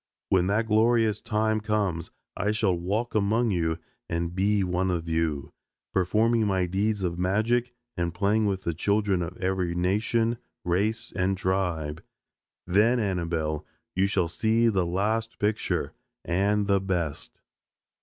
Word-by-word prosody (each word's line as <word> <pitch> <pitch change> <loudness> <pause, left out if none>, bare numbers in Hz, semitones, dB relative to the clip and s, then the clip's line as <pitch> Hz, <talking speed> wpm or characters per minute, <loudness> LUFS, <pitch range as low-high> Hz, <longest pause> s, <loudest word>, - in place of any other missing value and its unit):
When 95 -1 +3
that 105 +3 +1
glorious 110 0 +3
time 110 0 +1
comes 100 -6 -1 0.3
I 105 +2 0
shall 110 -3 +2
walk 100 +8 -2
among 110 +2 +2
you 80 -3 0 0.3
and 85 0 -2
be 100 +2 +2
one 90 +1 0
of 85 -2 -2
you, 80 -3 -1 0.4
performing 110 +4 +2
my 95 -2 +1
deeds 100 +3 0
of 85 -1 -2
magic 115 +6 +1 0.2
and 85 -2 -1
playing 105 +4 +1
with 95 -1 -2
the 85 - -1
children 100 +2 +1
of 85 +1 -5
every 90 -2 -1
nation, 115 +6 +1 0.3
race 100 +6 0
and 95 +1 +1
tribe. 90 -5 -1 0.6
Then, 105 +7 +3
Annabelle, 85 -6 -1 0.3
you 95 +1 +2
shall 95 -4 +1
see 110 +6 +2
the 95 -5 +1
last 110 +5 -1
picture 105 +1 -1 0.3
and 100 +4 +1
the 100 -1 +3
best." 85 -6 -3
95 Hz, 140 wpm, -27 LUFS, 90-110 Hz, 0.6 s, When